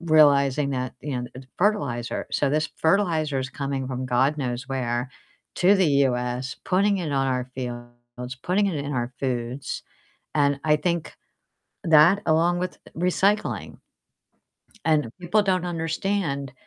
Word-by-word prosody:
realizing 145 -4 +4
that, 125 -1 -3
you 135 -4 -3
know, 125 - -5 0.3
fertilizer, 175 - 0
so 145 - +2
this 155 +1 +1
fertilizer 160 -5 +1
is 130 - -4
coming 135 -1 -3
from 130 0 -3
god 135 +4 +2
knows 125 0 -3
where 125 -1 -2 0.5
to 190 +2 +5
the 190 - +3 0.2
US, 125 +1 -2
putting 200 +2 +2
it 165 -4 -3
on 135 -1 +1
our 125 0 -2
fields, 120 0 -7
putting 200 +3 +2
it 180 -6 -1
in 140 0 -3
our 120 -1 -2
foods, 125 0 -3 0.5
and 140 -1 +2
I 150 -1 +3
think 170 +1 -2 0.7
that 165 +5 +6
along 170 +2 +3
with 180 - -3 0.2
recycling. 190 +4 0 1.0
And 155 -5 +2
people 205 +5 +2
don't 185 -2 +1
understand 165 -4 -2
145 Hz, 135 wpm, -24 LUFS, 130-175 Hz, 1.0 s, that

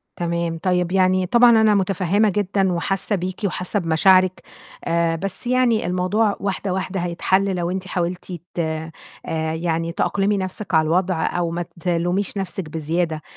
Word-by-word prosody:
تمام، 170 -1 -2
طيب 180 -1 +1
يعني 185 -1 +3
طبعًا 240 +4 +6
أنا 215 -1 +4
متفهّمة 195 +2 +2
جدًا 195 -1 0
وحاسّه 195 +4 -1
بيكِ 185 0 -4
وحاسّه 185 +2 -1
بمشاعرِك 185 +2 +3 0.4
آآ، 165 0 +1
بس 195 +7 -5
يعني 250 -5 +2
الموضوع 185 +4 +1
واحدة، 195 -1 -2
واحدة 190 0 -3
هيتحَلّ 190 +2 0
لو 175 0 -2
أنتِ 190 0 -4
حاولتِ 180 +1 -3 0.2
ت - - -5
آآ، 160 0 -3 0.6
يعني 165 0 -1
تأقلِمي 200 +3 0
نَفسِك 185 0 -5
على 160 0 +4
الوضع 175 0 +1
أو 175 -1 -1
ما 175 0 -3 0.2
تلوميش 175 +4 -1
نفسِك 190 -3 -4
بزيادة، 160 0 -2
185 Hz, 150 wpm, -21 LUFS, 170-195 Hz, 0.6 s, طبعًا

